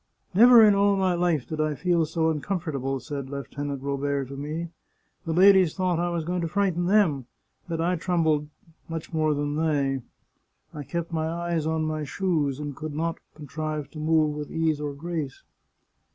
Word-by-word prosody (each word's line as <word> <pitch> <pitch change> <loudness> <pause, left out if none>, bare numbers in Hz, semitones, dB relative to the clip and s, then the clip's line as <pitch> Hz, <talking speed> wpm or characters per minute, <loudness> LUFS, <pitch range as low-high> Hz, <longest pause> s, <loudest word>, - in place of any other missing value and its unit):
" - - -46
Never 235 +3 +8
in 210 - +6
all 200 0 +3
my 190 -2 +2
life 175 -6 +1
did 155 -1 -3
I 155 -1 0
feel 170 -1 +1
so 160 0 +1
un 150 -2 -3
comfortable," 140 -8 -2
said 140 -1 -6
Lieutenant 140 0 -5
Robert 140 -1 -2
to 140 - -7
me. 155 +4 -4 0.3
" - - -44
The 165 - -2
ladies 190 0 +5
thought 185 -3 0
I 175 0 0
was 170 -2 -2
going 180 +1 -1
to 165 - -1
frighten 180 -1 0
them 175 - +2 0.2
— - - -32
but 165 -1 -2
I 175 +2 +1
trembled 160 -4 +1 0.4
much 165 +1 -6
more 155 -1 +2
than 145 +1 -2
they! 140 -4 0 0.7
I 150 - -6
kept 170 +3 -4
my 160 0 -1
eyes 170 -1 -2
on 160 0 0
my 155 -1 -2
shoes, 150 -4 -1
and 145 -2 -5
could 155 0 -6
not 165 +2 -2 0.2
contrive 150 0 -5
to 155 - -9
move 155 -1 +2
with 150 -1 -5
ease 160 -2 0
or 145 -1 -3
grace. 155 -3 -5
160 Hz, 195 wpm, -26 LUFS, 145-175 Hz, 0.7 s, Never